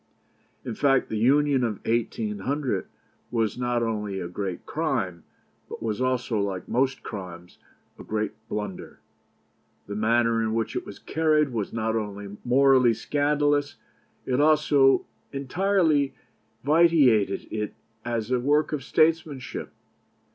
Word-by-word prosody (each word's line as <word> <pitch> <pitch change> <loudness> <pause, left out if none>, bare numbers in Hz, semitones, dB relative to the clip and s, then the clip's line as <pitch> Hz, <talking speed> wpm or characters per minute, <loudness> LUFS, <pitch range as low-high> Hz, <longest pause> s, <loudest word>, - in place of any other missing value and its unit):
"In 120 - -3
fact, 135 +2 +2
the - - -3
Union 140 +2 +3
of 110 -4 -3
1800 115 +4 -1 0.4
was 115 -3 0
not 120 -1 0
only 105 -4 -2
a 90 - -4
great 95 0 -5
crime, 90 -3 -2 0.5
but - - -7
was 110 +1 -2
also, 130 -3 0
like 100 -2 -3
most 130 +2 0
crimes, 90 -4 -8 0.4
a - - -8
great 110 0 -2 0.2
blunder. 105 -3 -5 0.9
The 100 - -6
manner 115 +1 +2
in 110 0 -1
which 115 -1 -2
it - - -3
was - - -9
carried 155 -2 +1
was 110 -5 -3
not 110 0 -1
only 100 -2 -4
morally 130 -2 +4
scandalous; 145 0 +1 0.5
it 130 0 0
also 150 -3 +4 0.3
entirely 155 0 +1 0.5
vitiated 145 -9 +4
it 105 -1 -3 0.3
as 115 0 -3
a 125 - +2
work 145 +4 +2
of 145 -3 -2
statesmanship. 155 -3 0
120 Hz, 125 wpm, -26 LUFS, 105-145 Hz, 0.9 s, morally